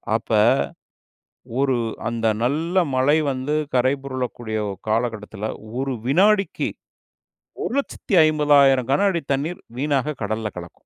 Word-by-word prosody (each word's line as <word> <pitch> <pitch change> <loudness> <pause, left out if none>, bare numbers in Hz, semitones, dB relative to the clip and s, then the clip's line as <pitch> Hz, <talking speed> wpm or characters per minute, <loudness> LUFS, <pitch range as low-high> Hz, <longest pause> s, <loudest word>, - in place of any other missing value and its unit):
அப்ப 115 - -4 1.3
ஒரு 135 -1 +2 0.3
அந்த 115 -1 -2 0.2
நல்ல 160 +8 -1 0.2
மழை 130 +4 +3
வந்து 135 +3 -2 0.2
கரை 130 +1 +3
பொரலக்கூடிய 125 -4 -4 0.3
காலகட்டத்தில 110 -2 -2 0.3
ஒரு 135 0 -1
வினாடிக்கி 195 +8 +2 0.9
1,50,000 150 - +3
கனஅடி 170 +4 +2
தண்ணீர் 150 +6 -1 0.2
வீணாக 145 +1 0
கடல்ல 110 +1 -2
கலக்கும். 85 -1 -10
135 Hz, 95 wpm, -22 LUFS, 120-150 Hz, 1.3 s, மழை